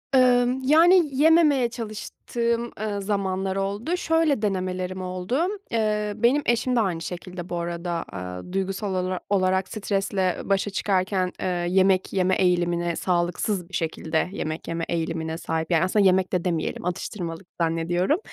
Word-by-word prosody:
Imm, 250 0 +4
yani, 335 +7 +6
yememeye 295 -3 +4
çalıştığım, 235 +1 -3
ııı, 205 -2 -2
zamanlar 190 -1 -1
oldu. 200 - -1
Şöyle 325 -7 +2
denemelerim 185 -2 -2
oldu; 185 +7 -2 0.3
eee, 210 -2 0
benim 240 +7 +3
eşim 240 +2 +1
de - - +3
aynı 185 -7 0
şekilde 175 +1 -7
bu - - -3
arada, 170 +1 -3 0.2
aaa, 90 - -7
duygusal 195 +1 -2
olara 185 0 -1
olarak 190 -1 +2
stresle 195 -3 -1
başa 195 +1 0
çıkarken, 185 -1 0
eee, - - -1 0.2
yemek 190 0 +3
yeme 185 -1 +2
eğilimine, 175 -2 +1
sağlıksız 180 +2 -1
bir - - -22
şekilde 160 0 -1
yemek 160 -5 -4
yeme 165 0 -2
eğilimine 165 -1 -2
sahip. 160 0 -3
Yani, 165 0 +4
aslında 195 +2 +3
yemek 185 0 +3
de 180 -2 +1
demeyelim 170 -1 -2
atıştırmalık 180 -1 -4
zannediyorum. 170 - +1
190 Hz, 140 wpm, -25 LUFS, 175-215 Hz, 0.3 s, yani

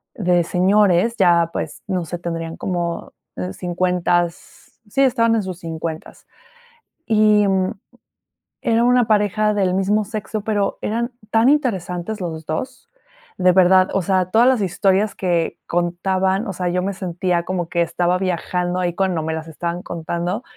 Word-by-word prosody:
de 175 -4 +2
señores, 195 +4 +3
ya, 170 -3 +4
pues, - - -5
no 185 -3 -1
sé, 175 - -5
tendrían 165 -1 -4
como 175 -2 -3 0.4
cincuentas, 175 -1 -2
sí, 270 - 0
estaban 230 -3 +3
en 220 - 0
sus 185 -1 -6
cincuentas. 160 -1 -6 0.8
Y, 215 -2 +4
mm, 190 +1 +1 0.9
era 230 -1 +2
una 245 -2 +4
pareja 210 0 +2
del 190 -3 +1
mismo 200 +3 +1
sexo, 215 0 -4
pero 205 -1 -1
eran 235 +3 -2 0.2
tan 225 +2 +4
interesantes 210 - -1
los 160 -2 -5
dos. 255 - -5 0.5
De 180 -1 +4
verdad, 185 0 +5
o 195 - +1
sea, 185 0 +1
todas 230 +2 +5
las 260 -3 +4
historias 195 +2 +1
que 175 -3 -1
contaban, 190 +4 0
o - - -2
sea, 180 0 -3
yo 180 +1 0
me 195 - -1
sentía 180 -1 -1
como 175 -2 -3
que 170 - 0
estaba 175 +1 +1
viajando 180 0 -2
ahí 175 -1 -1
cuando 185 -4 0
me 160 0 -2
las 160 0 -5
estaban 170 +2 -4
contando. 170 +6 -3
185 Hz, 150 wpm, -20 LUFS, 175-210 Hz, 0.9 s, verdad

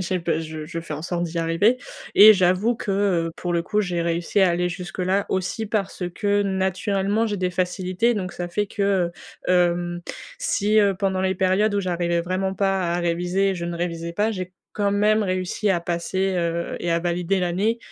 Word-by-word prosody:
j'ai 185 0 -1
pe 165 -1 0
je 155 -1 -6
je 165 - -5
fais 165 -2 -7
en 150 - -4
sorte 175 0 -2
d'y 170 0 -4
arriver 165 +9 +2 0.4
et 215 +1 +10
j'avoue 185 +5 +2
que, 205 - -4
heu, 190 -4 +1
pour 175 -1 -3
le 170 - +1
coup, 210 +4 0
j'ai 175 -3 -1
réussi 170 +3 0
à 190 -2 +5
aller 175 +1 0
jusque-là 185 +2 -2
aussi 190 +4 -1
parce 200 -3 -2
que 205 -1 +1
naturellement 195 +2 0
j'ai 205 -2 -2
des 180 0 0
facilités. 185 +5 0
Donc 190 -4 -3
ça 175 0 -5
fait 205 +3 -1
que, 195 -4 0 0.4
heu, - - +4
hem, 175 -1 +1 0.4
si, 215 - +1
heu, 200 -2 +4
pendant 190 0 -1
les 190 0 +1
périodes 190 +3 +2
où 200 - +2
j'arrivais 175 -2 0
vraiment 185 +2 -1
pas 190 -3 0
à 175 - 0
réviser 175 +3 0
et 190 - -1
je 170 - -4
ne 170 0 -3
révisais 170 -1 -3
pas, 210 +5 +1
j'ai 185 -3 -5 0.2
quand 205 -1 +1
même 210 +2 +3
réussi 185 +2 -1
à 175 -3 +2
passer, 175 +3 -1
heu 170 -1 -1
et 175 - -2
à 170 - +2
valider 175 +2 0
l'année, 195 +6 0
185 Hz, 205 wpm, -23 LUFS, 175-200 Hz, 0.4 s, et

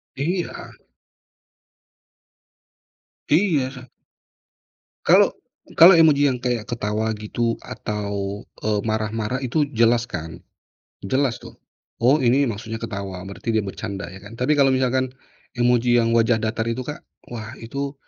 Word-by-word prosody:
Iya. 175 +6 -3 2.6
Iya 155 -5 +2
sa 125 -1 -12 1.2
Kalau - - +6 0.5
kalau 175 +3 +10
emoji 155 -3 +5
yang 130 -2 -1
kayak 120 -3 -1
ketawa, 110 -1 -2
gitu, 115 +2 -2
atau, 100 -1 -4 0.2
eee, 105 -1 +1
marah-marah 110 +2 -2
itu 135 +4 0
jelas 120 -1 +2
kan. 80 +1 -6 0.6
Jelas 130 +3 +1
tuh. - - -11 0.5
Oh 130 +5 +5
ini 130 +3 +3
maksudnya 110 +1 -5
ketawa, 100 -4 -5
berarti 100 +4 -4
dia 110 - +3
bercanda, 100 -1 -6
ya 95 - -10
kan. 100 - -11
Tapi 130 +5 +2
kalau 135 -1 +5
misalkan 130 0 +1 0.4
emoji 120 0 +3
yang 115 0 +2
wajah 115 0 +3
datar 110 0 -1
itu 130 +2 -3
Kak, 150 - -6 0.3
wah 115 -2 -7
itu 140 +5 -4
115 Hz, 125 wpm, -22 LUFS, 110-130 Hz, 2.6 s, kalau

